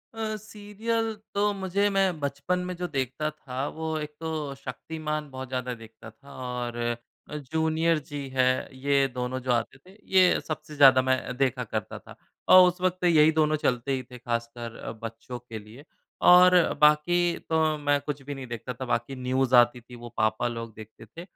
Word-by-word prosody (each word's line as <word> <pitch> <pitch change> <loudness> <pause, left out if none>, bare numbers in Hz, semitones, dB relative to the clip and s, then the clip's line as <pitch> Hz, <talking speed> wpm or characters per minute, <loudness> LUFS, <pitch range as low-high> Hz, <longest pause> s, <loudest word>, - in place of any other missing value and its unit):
अ, 220 -1 -3
serial 215 +2 -3 0.2
तो 205 +1 +2
मुझे 195 +1 0
मैं 195 -4 +1
बचपन 140 +5 -2
में 180 0 -4
जो 180 0 -3
देखता 135 +1 -2
था 135 -2 -5
वो 160 - -4
एक 150 0 -5
तो 155 -3 -4
शक्तिमान 150 +3 -5
बहुत 130 0 -6
ज़्यादा 125 -1 -3
देखता 115 0 -13
था 140 +5 -16
और 125 -2 -4 0.5
अ, - - -6 0.2
जूनियर 160 0 +1
जी 145 -2 -5
है। 130 -1 +2 0.3
ये 140 0 +2
दोनों 125 +1 -2
जो - - +3
आते 120 +2 -1
थे 185 +8 -19 0.2
ये 185 -1 +6
सबसे 155 -1 -6
ज़्यादा 135 -2 +7
मैं 130 -1 -1
देखा 130 -2 +1
करता 110 -2 -5
था। - - -14 0.3
और 185 0 +9
उस 180 +1 -2
वक़्त 185 0 0
यही 160 -3 +5
दोनों 155 -1 +2
चलते 125 -2 -1
ही 130 -1 -1
थे 125 - -8
ख़ासकर 115 -1 -4
अ, - - -6
बच्चों 115 +2 -8
के 115 -2 -8
लिए 110 +7 -14 0.4
और 180 0 +8 0.2
बाकी 150 +3 +5 0.3
तो 160 -1 +2
मैं 145 -1 +1
कुछ 145 -1 -5
भी 145 +1 -6
नहीं 135 -1 -8
देखता 120 +1 -6
था। 130 +2 -6
बाकी 120 +2 -2
न्यूज़ 130 0 +1
आती 120 0 +5
थी 120 +1 -13
वो 120 0 -9
पापा 110 +2 +1
लोग 115 -1 -6
देखते 110 +1 -12
थे। 140 +10 -11
140 Hz, 185 wpm, -27 LUFS, 125-160 Hz, 0.5 s, और